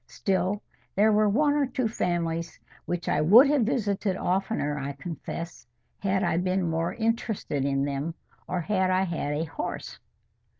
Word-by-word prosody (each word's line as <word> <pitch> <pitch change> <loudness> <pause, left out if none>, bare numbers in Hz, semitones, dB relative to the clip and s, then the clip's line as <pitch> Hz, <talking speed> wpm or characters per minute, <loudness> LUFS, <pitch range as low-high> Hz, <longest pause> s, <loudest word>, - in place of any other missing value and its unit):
Still 195 +1 -1 0.3
there 215 +2 +5
were 210 0 +4
one 290 +7 +3
or 290 -2 +2
two 255 -2 -1
families 170 -5 -2 0.3
which 175 -1 -3
I - - +2
would 210 - +8
have 290 -3 +3
visited 205 -6 0
oftener, 180 -7 -1
I 140 +1 -4
confess, 165 -1 -7 0.3
had 190 -1 +1
I - - +1
been 185 0 +1
more 165 +1 -1
interested 225 - -1
in 140 0 +1
them, 145 +4 -3 0.3
or 180 -1 -1
had 190 +1 +1
I 185 +1 +3
had 165 -5 -2
a 155 - 0
horse. 160 - -5
185 Hz, 160 wpm, -27 LUFS, 165-210 Hz, 0.3 s, would